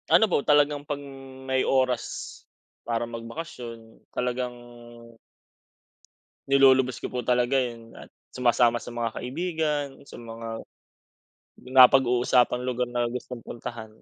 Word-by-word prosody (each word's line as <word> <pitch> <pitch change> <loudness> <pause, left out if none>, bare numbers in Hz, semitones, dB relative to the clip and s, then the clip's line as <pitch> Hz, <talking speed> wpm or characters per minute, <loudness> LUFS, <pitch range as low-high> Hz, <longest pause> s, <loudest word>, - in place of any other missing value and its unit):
Ano 220 - +6
po 180 -8 +1
talagang 145 0 +3
'pag 145 -1 -4 0.4
may 130 0 +1
oras, 130 -3 -1 0.4
para 115 0 -2
magbakasyon 115 -1 -8
talagang 125 0 -3 1.9
nilulubos 130 -2 +5
ko - - -7
po 125 - -1
talaga 125 +2 +2
yung 115 -2 -6 0.4
sumasama 120 -1 +3
sa - - -8
mga 120 -1 -2
kaibigan, 155 +1 -1 0.2
sa - - -10
mga 115 0 -8 1.1
napag-uusapang 125 -1 +5
lugar 125 -1 -1
na 120 -1 0
gustong 125 0 -6
puntahan. 115 -1 -8
125 Hz, 105 wpm, -26 LUFS, 120-135 Hz, 1.9 s, Ano